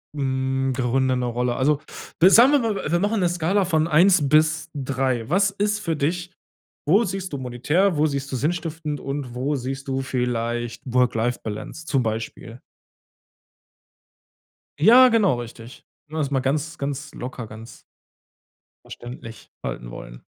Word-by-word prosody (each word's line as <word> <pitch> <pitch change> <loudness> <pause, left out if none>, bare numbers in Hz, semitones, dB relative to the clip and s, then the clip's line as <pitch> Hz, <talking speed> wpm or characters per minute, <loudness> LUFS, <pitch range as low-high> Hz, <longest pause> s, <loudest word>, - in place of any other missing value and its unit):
hm, 135 -1 -1
Gründe 130 +1 +1
'ne 125 - -1
Rolle. 120 0 -1
Also, 145 +2 +1 0.4
sagen 235 +8 +8
wir 290 - +5
mal, 225 -4 -1
w 165 - -4
wir 175 - +2
machen 205 +1 0
'ne 175 - +2
Skala 175 +3 +1
von 160 -2 +1
1 170 -1 +4
bis 155 +1 +3
3. 130 -4 -1
Was 195 +3 +3
ist 205 +1 -1
für 165 -6 -2
dich 175 +5 -2 0.6
wo 200 +9 +5
siehst 190 -4 -4
du 140 - -3
monetär, 150 +9 0
wo 155 - +3
siehst 140 -2 -2
du - - -2
sinnstiftend 160 0 -2
und 135 -3 -5
wo 135 +4 -1
siehst 135 +1 -5
du 135 0 -1
vielleicht 120 -2 -2
Work-Life-Balance 125 +2 -1
zum 135 -4 +1
Beispiel? 115 +1 -5 2.2
Ja, 250 +7 +8
genau 215 - +3
richtig. 115 0 -11 0.2
Ne, 155 +1 -7
also 140 -2 -1
mal 135 - +2
ganz, 145 +4 -2
ganz 140 +1 -4
locker, 125 -2 -7
ganz 110 +2 -12 1.0
verständlich 120 -2 -10
halten - - -5
wollen. - - -10
140 Hz, 145 wpm, -23 LUFS, 125-170 Hz, 2.2 s, sagen